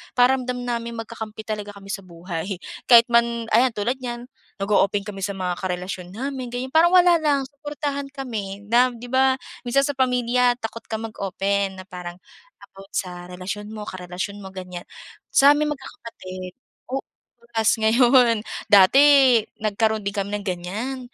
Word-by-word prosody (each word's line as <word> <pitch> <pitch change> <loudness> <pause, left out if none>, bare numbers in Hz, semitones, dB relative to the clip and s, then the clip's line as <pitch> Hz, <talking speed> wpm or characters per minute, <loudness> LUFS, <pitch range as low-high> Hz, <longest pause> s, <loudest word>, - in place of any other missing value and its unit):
Pakiramdam 250 0 +2
namin 235 -1 -3
magkakampi 220 -1 -7
talaga 210 -1 -5
kami 195 0 -9
sa 195 - -3
buhay. 175 +1 -5 0.3
Kahit 235 -2 +8
man 235 0 +2
ayan, 250 +2 +4
tulad 235 +6 -1
niyan, 240 -1 -6 0.3
nag-o-open 200 0 +2
kami 200 -2 -6
sa 200 0 -2
mga 180 -2 -3
karelasyon 180 -1 -4
namin, 260 +1 -4
ganyan. 250 +2 -4
Parang 335 +3 +5
wala 350 -2 +6
lang. 290 -3 +1
Suportahan 285 0 -5
kami 215 -8 -5
na, 245 +2 +6
'di 240 0 -10
ba, 260 0 +4 0.3
minsan 275 +3 +3
sa 285 - -3
pamilya 250 -1 +2
takot 230 0 -6
kang 220 0 -4
mag-open 200 -1 -2
na 185 - -9
parang 180 -1 -7 0.6
about 195 0 -14
sa 180 -1 -4
relasyon 190 +3 -6
mo, 215 -1 -6
karelasyon 185 +2 -5
mo, 195 - -9
ganyan. 180 -2 -8 0.4
Sa'ming 295 +2 +5
magkakapatid 185 -9 -8 0.4
oo, 270 +1 -2 0.4
bukas 230 -2 0
ngayon. 235 0 +5 0.3
Dati 200 +6 +7 0.6
nagkaroon 220 0 0
din 200 - -3
kami 200 0 -2
ng 205 - -11
ganyan. 195 +9 -3
225 Hz, 150 wpm, -23 LUFS, 195-250 Hz, 0.6 s, Kahit